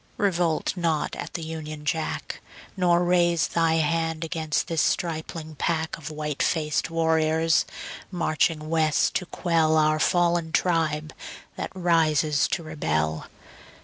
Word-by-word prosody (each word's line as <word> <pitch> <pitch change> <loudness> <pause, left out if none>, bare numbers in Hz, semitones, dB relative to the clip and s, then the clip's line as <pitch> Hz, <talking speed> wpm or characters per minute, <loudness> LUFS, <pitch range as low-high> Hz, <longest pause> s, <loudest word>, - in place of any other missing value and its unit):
Revolt 175 -7 +1
not 165 -4 -1
at - - -7
the 170 - -3
Union 155 -2 -6
Jack, 160 +1 -3 0.3
Nor 175 -2 +3
raise 175 -2 +3
Thy 165 -1 +2
hand 165 +1 0
against 160 -1 -1
this 165 -3 0
stripling 160 -1 -2
pack 160 0 -1
Of 155 -3 -8
white 150 -2 -4
faced 155 -2 0
warriors, 160 0 +2 0.4
marching 155 -3 0
West 160 -1 +2
to 180 - -6
quell 160 -3 +1
Our 155 0 +3
fallen 170 -1 +2
tribe 155 -3 0 0.4
that - - -4
rises 155 -5 +2
to 170 - -2
rebel. 80 - -2
160 Hz, 125 wpm, -25 LUFS, 155-170 Hz, 0.4 s, Nor